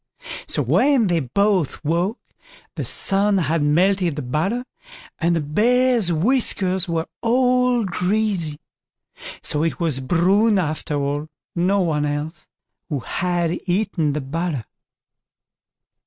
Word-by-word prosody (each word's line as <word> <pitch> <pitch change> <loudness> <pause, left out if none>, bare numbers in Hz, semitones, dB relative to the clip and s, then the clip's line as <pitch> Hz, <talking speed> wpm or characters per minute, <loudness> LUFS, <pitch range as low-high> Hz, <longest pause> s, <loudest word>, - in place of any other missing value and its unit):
So - - +1
when 275 -5 +3
they 175 -3 +1
both 180 - 0
woke, 175 - 0 0.6
the - - -4
sun 200 +1 +2
had 165 -2 0
melted 175 +3 +2
the 150 - -4
butter, 180 - -2 0.5
and 170 0 +1
the 165 - 0
Bear's 230 - +2
whiskers 190 -1 +2
were 165 -1 -1 0.2
all 250 0 +2
greasy; 185 -3 -1 0.6
and - - -11
so 150 - +1
it 165 - -2
was 160 -6 0
Bruin 190 - +2
after 155 -3 -2
all, 145 0 -1
and 155 +1 -10 0.4
no 200 +1 +2
one 150 -4 0
else, 150 +2 -5 0.4
who 145 -5 -2
had 175 +3 -1
eaten 175 -5 0
the 150 - -2
butter. 145 - -3
175 Hz, 125 wpm, -21 LUFS, 155-205 Hz, 0.6 s, when